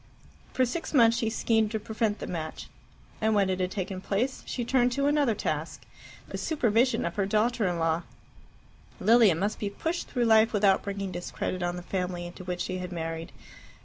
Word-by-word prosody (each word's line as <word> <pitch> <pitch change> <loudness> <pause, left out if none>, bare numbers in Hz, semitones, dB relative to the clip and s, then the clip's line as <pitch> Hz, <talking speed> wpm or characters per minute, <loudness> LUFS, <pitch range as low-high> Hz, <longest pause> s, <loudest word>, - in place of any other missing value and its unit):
For 255 - +2
six 300 +5 -4
months 230 -3 +6
she 225 -3 0
schemed 220 -1 +1
to 220 0 -2
prevent 215 0 -1
the - - -6
match, 160 -3 -5 0.5
and 220 0 +2
when 195 -2 +3
it 185 - -2
had 180 0 0
taken 190 -1 -4
place 230 +8 -1
she 240 - -3
turned 245 0 +3
to 280 +1 0
another 285 -6 +2
task - - -3 0.5
the - - -5
supervision 240 -5 +2
of 170 - -4
her 195 -2 +1
daughter 220 +1 +1
in 175 -1 -1
law. 165 0 +1 1.0
Lilia 225 -5 +5
must 200 +6 -2
be 205 - -2
pushed 325 - -3
through 245 -2 0
life 220 0 +5
without 200 -2 +4
bringing 200 -1 -4
discredit 180 +1 -4
on 175 0 -1
the 180 - -7
family 180 -1 -3
into 175 +1 -9
which 180 -1 -4
she 185 +1 -3
had 180 0 -5
married. 165 -1 -4
205 Hz, 190 wpm, -28 LUFS, 180-235 Hz, 1.0 s, months